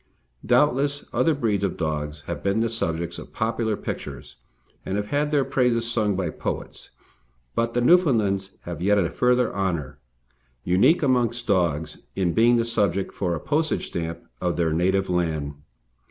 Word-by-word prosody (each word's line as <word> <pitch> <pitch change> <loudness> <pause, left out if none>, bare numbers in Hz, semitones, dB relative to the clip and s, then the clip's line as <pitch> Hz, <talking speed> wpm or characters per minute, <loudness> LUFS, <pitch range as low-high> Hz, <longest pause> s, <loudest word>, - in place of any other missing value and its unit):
Doubtless, 140 +3 +2
other 130 +6 +2
breeds 105 -7 0
of 100 - -1
dogs 75 -2 -3
have 85 +3 -5
been 100 +3 +1
the 115 0 0
subjects 85 -6 -2
of - - -12
popular 110 -1 -1
pictures 70 -3 -7 0.5
and 95 - -2
have 105 0 -3
had 145 +1 +1
their 145 -3 +2
praises 120 -3 +1
sung 105 -4 +1
by 90 -4 -1
poets, - - -5 0.6
but 115 0 -1
the 120 - +2
Newfoundlands 115 - +3
have 85 -2 -7
yet 100 +3 +3
a 85 -4 +1
further 125 +3 +2
honour, 90 -8 -2 0.6
unique 120 - +4
amongst 120 -3 +1
dogs, 85 -7 0 0.2
in 90 -3 +1
being 120 +2 +5
the 115 -1 +2
subject 100 -5 0
for 90 -3 -1
a - - -4
postage 155 - 0
stamp 85 0 -4 0.2
of 90 -1 0
their 80 -2 +1
native 95 +3 +1
land. 80 -5 -1
100 Hz, 160 wpm, -24 LUFS, 85-120 Hz, 0.6 s, being